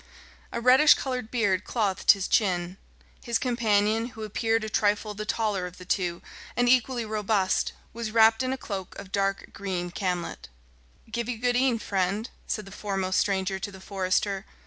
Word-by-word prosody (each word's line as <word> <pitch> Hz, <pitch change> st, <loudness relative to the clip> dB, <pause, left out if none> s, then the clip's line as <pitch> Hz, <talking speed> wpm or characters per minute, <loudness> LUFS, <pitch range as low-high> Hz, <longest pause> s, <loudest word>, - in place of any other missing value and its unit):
A -, -, -2 dB
reddish 260 Hz, +5 st, +7 dB
coloured 250 Hz, -4 st, -3 dB
beard 205 Hz, -7 st, +1 dB
clothed 205 Hz, -5 st, -1 dB
his 195 Hz, -2 st, -3 dB
chin. 180 Hz, -3 st, +1 dB, 0.5 s
His 235 Hz, -2 st, +1 dB
companion, 225 Hz, -2 st, +1 dB
who 225 Hz, -3 st, -9 dB
appeared 225 Hz, +1 st, 0 dB
a -, -, -3 dB
trifle 210 Hz, 0 st, +1 dB
the 215 Hz, +1 st, -5 dB
taller 210 Hz, -5 st, 0 dB
of 180 Hz, -, -12 dB
the 180 Hz, -, -11 dB
two, 175 Hz, -2 st, -1 dB, 0.3 s
and 245 Hz, 0 st, +2 dB
equally 245 Hz, -1 st, +3 dB
robust, 210 Hz, -3 st, 0 dB, 0.2 s
was 230 Hz, -1 st, -4 dB
wrapped 225 Hz, +1 st, +5 dB
in 255 Hz, 0 st, -1 dB
a 265 Hz, -, -2 dB
cloak 195 Hz, -7 st, -6 dB
of 190 Hz, -, -9 dB
dark 195 Hz, 0 st, -1 dB
green 180 Hz, -3 st, -3 dB
camlet. 180 Hz, -, -3 dB, 0.6 s
"Give 235 Hz, +1 st, -2 dB
you 245 Hz, -, -2 dB
good 245 Hz, +2 st, +1 dB
e'en, 250 Hz, -1 st, +3 dB
friend," 200 Hz, +2 st, -1 dB, 0.2 s
said 215 Hz, -, -3 dB
the 195 Hz, -, -12 dB
foremost 195 Hz, -2 st, -1 dB
stranger 190 Hz, -1 st, 0 dB
to 205 Hz, -, -5 dB
the 190 Hz, -, -11 dB
forester. 195 Hz, +1 st, -1 dB
210 Hz, 170 wpm, -27 LUFS, 190-230 Hz, 0.6 s, reddish